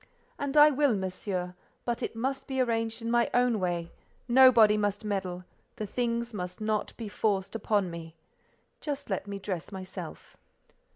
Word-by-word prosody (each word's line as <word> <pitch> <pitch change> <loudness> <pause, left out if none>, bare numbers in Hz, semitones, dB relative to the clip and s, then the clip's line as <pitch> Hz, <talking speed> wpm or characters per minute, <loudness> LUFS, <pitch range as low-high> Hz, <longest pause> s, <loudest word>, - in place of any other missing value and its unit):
"And 285 +1 -1
I 300 +1 +9
will, 285 -4 +3
Monsieur; 185 -1 -3 0.3
but 240 -1 -1
it - - -3
must 265 +4 -2
be 265 -2 -2
arranged 225 -2 0
in 230 - -1
my 240 0 +3
own 245 -3 +3
way: 175 -2 -2 0.4
nobody 240 -4 +7
must 205 0 -1
meddle; 185 -3 -3 0.3
the 215 - -4
things 235 +2 -2
must 180 -3 -5
not 215 -1 -1
be 225 - -5
forced 200 -2 -1
upon 205 -4 0
me. 165 -1 -8 0.6
Just 285 -5 -5
let 190 +1 -2
me 200 0 -4
dress 190 -3 -5
myself." 190 -1 -8
215 Hz, 160 wpm, -29 LUFS, 190-240 Hz, 0.6 s, I